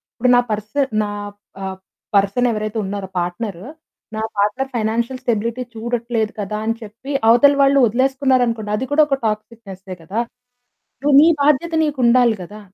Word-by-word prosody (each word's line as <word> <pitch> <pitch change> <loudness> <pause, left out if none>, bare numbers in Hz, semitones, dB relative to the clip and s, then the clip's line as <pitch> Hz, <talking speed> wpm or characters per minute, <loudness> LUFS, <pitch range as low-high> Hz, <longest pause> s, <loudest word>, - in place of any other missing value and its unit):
ఇప్పుడు 250 +1 +1
నా 245 - +5
పర్సన్ 215 +7 -1
నా 205 - -3 0.5
ఆహ్, 190 0 -5 0.4
పర్సన్ 200 +5 +3
ఎవరైతే 215 0 -3
ఉన్నారో, 195 -1 -4
పార్ట్నర్, 175 +1 -4 0.5
నా 220 - -3 0.2
పార్ట్నర్ 230 +7 0
ఫైనాన్షియల్ 235 +3 -1
స్టెబిలిటీ 235 +1 -1
చూడట్లేదు 230 -1 -2
కదా 210 +1 -3
అని 225 0 0
చెప్పి 225 +6 -9 0.2
అవతల 245 +5 +6
వాళ్ళు 275 0 +4
వదిలేసుకున్నారనుకోండి, 250 -3 +1
అది 255 +5 -2
కూడా 305 +1 +4
ఒక 275 - +1
టాక్సిక్నెసే 210 -3 -5
కదా! 200 +8 -3 0.8
ను 295 - +2
నీ 315 - +7
బాధ్యత 300 +4 +2
నీకు 295 -2 -1
ఉండాలి 235 -2 +4
కదా. 210 +4 -11
230 Hz, 145 wpm, -19 LUFS, 210-255 Hz, 0.8 s, నీ